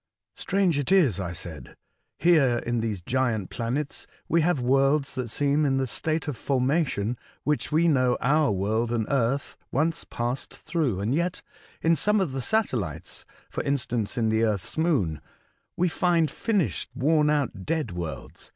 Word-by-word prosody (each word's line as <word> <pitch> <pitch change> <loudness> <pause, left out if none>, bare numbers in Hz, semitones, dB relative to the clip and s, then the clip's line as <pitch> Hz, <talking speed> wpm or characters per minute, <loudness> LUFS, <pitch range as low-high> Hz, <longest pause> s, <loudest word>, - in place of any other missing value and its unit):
*' - - -61
Strange 190 -6 +1
it 145 - -2
is," 155 - +4
I 90 -3 -3
said, 80 -6 -9 0.2
" - - -49
here 150 -8 +4
in 120 0 0
these 110 -5 -2
giant 120 -4 0
planets 130 +5 -3 0.2
we 170 - +3
have 165 -2 +2
worlds 135 +3 +2
that 130 -3 -3
seem 145 +5 +1
in 135 -2 +2
the 135 - +1
state 155 +8 -1
of 145 - -2
formation 130 -3 0 0.2
which 150 +1 -1
we 165 +3 +3
know 130 -5 +3
our 150 0 +3
world 110 +4 0
and 115 -2 0
Earth 135 +1 0 0.2
once 160 +4 0
passed 120 +2 -4
through; 135 - -1
and 110 +5 0
yet 170 +3 -1 0.4
in 165 +1 +4
some 210 +5 +2
of 185 -7 0
the 135 0 -3
satellites 120 - -2 0.3
(for - - -2
instance, 120 -5 -1
in 115 -2 +2
the 110 +1 +2
Earth's 105 -4 -1
Moon), 130 - +1 0.6
we 180 - +3
find 170 -2 +2
finished, 205 -7 -1
worn 150 +3 +3
out, 140 -10 0
dead 155 - -1
worlds. 85 -3 -7
135 Hz, 170 wpm, -26 LUFS, 115-155 Hz, 0.6 s, is